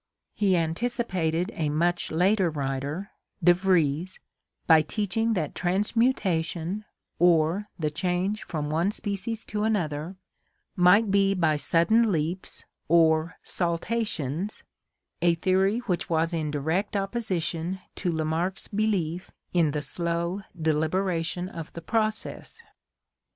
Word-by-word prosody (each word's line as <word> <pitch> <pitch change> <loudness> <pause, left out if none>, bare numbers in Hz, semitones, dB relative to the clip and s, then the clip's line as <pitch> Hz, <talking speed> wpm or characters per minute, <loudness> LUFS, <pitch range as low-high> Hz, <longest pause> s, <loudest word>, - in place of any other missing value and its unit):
He 195 -3 +2
antic 170 +9 0
ipated 175 +2 0
a 155 -2 -1
much 175 +4 +1
later 185 +3 +3
writer, 145 +5 -3 0.3
De 175 - +7
Vries, 180 -2 +1 0.5
by 160 -2 +7
teaching 215 +7 -1
that 155 -6 -2
transmuta 195 -1 +1
tion, 175 +5 -5 0.3
or 175 +4 +3
the 155 -3 -1
change 185 +5 -1
from 150 -3 -4
one 165 +5 +2
species 210 +2 -3
to 210 0 -2
another, 175 -5 -1 0.6
might 195 +4 +5
be 195 0 +3
by 160 -4 +2
sudden 210 +9 +3
leaps 165 +2 -3 0.2
or 160 0 +3
saltations, 175 - -2 0.6
a 170 -1 +4
theory 190 +5 +2
which 180 -8 -2
was 165 +1 +1
in 155 -2 -1
direct 160 +8 -1
opposition 190 -4 -2 0.2
to 180 - -1
Lamarck's 160 +4 -1
belief 190 -5 -1 0.2
in 170 -4 +3
the 150 0 -2
slow 170 +4 -1 0.2
deliberation 165 +3 0
of 165 -4 -8
the 170 - -7
process. 220 - -2
175 Hz, 120 wpm, -26 LUFS, 160-200 Hz, 0.6 s, De